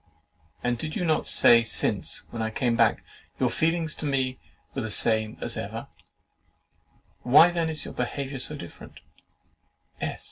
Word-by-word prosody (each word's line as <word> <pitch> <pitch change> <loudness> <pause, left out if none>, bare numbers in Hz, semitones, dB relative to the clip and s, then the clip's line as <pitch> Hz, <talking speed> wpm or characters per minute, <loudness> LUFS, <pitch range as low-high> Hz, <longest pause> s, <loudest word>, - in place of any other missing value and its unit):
And 120 -1 -1
did 155 +3 -6
you 180 - -2
not 155 -2 0
say 115 -1 +6
since 115 - +1
I 110 -1 -3
came 120 +1 -1
back, 115 -2 +1 0.4
'YOUR - - +1
FEELINGS 165 -1 0
TO 150 - -5
ME 130 -2 -1 0.4
WERE 135 - -4
THE 110 - -5
SAME 110 0 +3
AS - - 0
EVER?' - - -7 1.3
Why 155 +8 +5
then 170 -2 -2
is 155 -1 -1
your - - -8
behaviour 135 -1 -5
so 150 +4 -2
different?" 85 - -12
135 Hz, 145 wpm, -25 LUFS, 115-155 Hz, 1.3 s, say